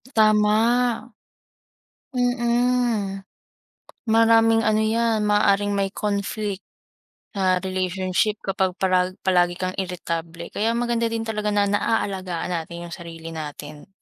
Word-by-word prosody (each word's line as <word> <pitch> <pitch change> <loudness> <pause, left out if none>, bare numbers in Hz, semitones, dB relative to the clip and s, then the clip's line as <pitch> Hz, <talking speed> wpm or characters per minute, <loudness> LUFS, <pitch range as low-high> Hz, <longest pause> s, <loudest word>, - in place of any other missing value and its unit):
Tama. 215 -1 +4 1.6
Mm. 240 -5 0 0.8
Maraming 225 0 +5
ano 215 0 +3
'yan, 225 0 +1
maaaring 205 -1 +3
may 195 -1 0
conflict, 205 -1 -3 0.7
ah, 185 -2 +2
relationship 185 +2 0
kapag 190 -1 0
parag 185 0 +1
palagi 175 -2 +3
kang 185 0 -2
irritable. 170 -2 -4
Kaya 225 +2 +1
maganda 235 -1 0
din 225 0 -2
talaga 215 -1 -1
na 205 -1 +2
naalagaan 190 -4 -1
natin 170 +1 -5
'yung 170 - -9
sarili 165 -2 -9
natin. 150 -1 -8
200 Hz, 105 wpm, -23 LUFS, 180-220 Hz, 1.6 s, Maraming